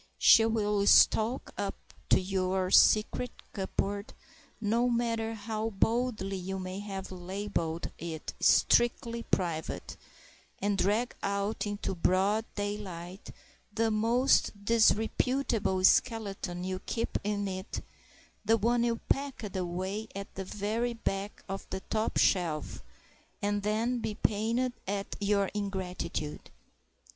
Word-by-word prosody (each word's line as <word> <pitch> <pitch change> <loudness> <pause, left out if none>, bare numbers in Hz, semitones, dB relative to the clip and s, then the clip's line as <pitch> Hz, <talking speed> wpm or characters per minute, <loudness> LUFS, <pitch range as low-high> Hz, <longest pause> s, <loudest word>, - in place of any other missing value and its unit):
She 225 - +7
will 210 -2 +1
stalk 230 +4 +5
up 200 -1 -2 0.3
to - - +6
your 185 0 -1
secret 220 +3 +5 0.2
cupboard, 200 +1 -3 0.4
no 230 +3 +2
matter 230 -1 0
how 220 +1 -3
boldly 220 -2 0
you 190 +1 -4
may 185 +1 -5
have 195 -2 -6
labelled 185 -2 -3
it 160 -2 -5
"strictly 235 0 +3
private," 170 -7 -2 0.6
and 205 +1 0
drag 210 +5 +1
out 200 +2 -1
into 205 -1 -3
broad 190 +5 +2
daylight 195 -3 -5 0.4
the 225 +1 +1
most 225 -1 +2
disreputable 225 -2 +2
skeleton 195 -5 +2
you 185 0 -3
keep 230 +4 -2
in 205 0 -1
it, 190 0 -5 0.6
the 225 +2 +4
one 235 +2 +2
you 235 -1 +1
packed 270 -8 -2
away 185 +4 -3
at 200 0 -6
the 195 - -5
very 215 +5 -2
back 200 -2 -3
of 195 0 -5
the 190 - -4
top 220 0 0
shelf—and 175 - -2
then 225 +4 0
be 215 -2 -3
pained 230 +4 0
at 200 0 -3
your 200 -1 +1
ingratitude! 185 -6 -4
205 Hz, 115 wpm, -30 LUFS, 190-225 Hz, 0.6 s, She